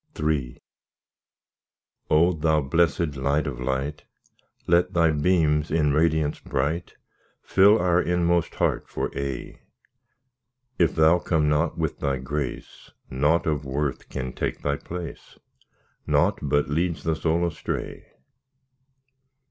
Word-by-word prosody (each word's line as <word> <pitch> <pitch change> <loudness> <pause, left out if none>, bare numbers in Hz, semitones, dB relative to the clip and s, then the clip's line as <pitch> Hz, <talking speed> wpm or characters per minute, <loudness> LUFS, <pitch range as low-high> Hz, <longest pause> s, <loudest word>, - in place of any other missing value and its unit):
III 75 -5 -1 1.5
O! 85 +4 +4
Thou 80 -1 +1
blessed 80 +2 +1
Light 70 +3 0
of 65 -5 -5
light! 65 +3 -3 0.6
Let 85 +1 +2
Thy 85 -2 +3
beams 75 -1 +2
in 75 -3 +2
radiance 80 -1 +1
bright 80 +6 -2 0.5
Fill 100 +3 +5
our 90 0 +2
inmost 85 -1 0
heart - - -1
for - - -4
aye. 70 -2 -5 1.2
If 85 -3 +3
Thou 80 +2 +5
come 80 -3 +1
not 75 +2 +1
with 80 -2 -2
Thy 70 -1 -1
grace, 65 +1 -5 0.2
Nought 75 +6 +2
of 75 -2 -1
worth 70 0 -3
can 65 -1 -5
take - - -4
Thy 70 0 0
place, 90 -2 -8 0.7
Nought - - +2
but 75 -1 +1
leads 80 +3 -1
the 80 -1 0
soul 85 +2 0
astray. 85 - -5
75 Hz, 120 wpm, -25 LUFS, 70-85 Hz, 1.5 s, Fill